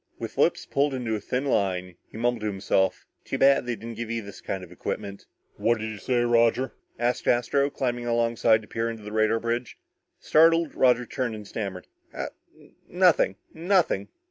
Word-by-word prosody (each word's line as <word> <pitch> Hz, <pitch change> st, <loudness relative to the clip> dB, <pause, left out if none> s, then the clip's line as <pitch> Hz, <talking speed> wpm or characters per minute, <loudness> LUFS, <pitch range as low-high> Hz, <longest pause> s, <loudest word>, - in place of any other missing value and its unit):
With -, -, -6 dB
lips -, -, +2 dB
pulled 140 Hz, 0 st, +1 dB
into 120 Hz, -3 st, -2 dB
a 110 Hz, -, -1 dB
thin 125 Hz, +6 st, -2 dB
line, 90 Hz, -7 st, 0 dB
he -, -, -11 dB
mumbled 120 Hz, 0 st, 0 dB
to 105 Hz, -, -2 dB
himself: 95 Hz, -1 st, 0 dB, 0.2 s
"Too -, -, -3 dB
bad 135 Hz, -2 st, +4 dB
they 120 Hz, -, -1 dB
didn't 115 Hz, +2 st, -8 dB
give 115 Hz, -1 st, -4 dB
you 115 Hz, -1 st, -2 dB
this 100 Hz, 0 st, -11 dB
kind 95 Hz, -1 st, -4 dB
of 90 Hz, -, -12 dB
equipment." 100 Hz, +2 st, -5 dB, 0.3 s
"What'd 110 Hz, +1 st, +1 dB
you 110 Hz, -1 st, -6 dB
say, 125 Hz, -2 st, +1 dB
Roger?" 120 Hz, +2 st, +3 dB, 0.3 s
asked 120 Hz, +1 st, -1 dB
Astro, 130 Hz, +4 st, +2 dB
climbing 120 Hz, -3 st, -2 dB
alongside 115 Hz, -1 st, +2 dB
to -, -, -14 dB
peer 115 Hz, +1 st, -2 dB
into 115 Hz, -2 st, -7 dB
the 105 Hz, -, -7 dB
radar 110 Hz, +1 st, +2 dB
bridge. 120 Hz, +1 st, -3 dB, 0.4 s
Startled, 165 Hz, 0 st, +4 dB
Roger 125 Hz, -1 st, +3 dB
turned 120 Hz, -1 st, -3 dB
and 105 Hz, -2 st, -9 dB
stammered, 95 Hz, -5 st, -5 dB, 0.3 s
"Ah -, -, -3 dB, 0.6 s
nothing -, -, +3 dB, 0.2 s
nothing." 170 Hz, -, +1 dB
115 Hz, 180 wpm, -26 LUFS, 105-125 Hz, 0.6 s, bad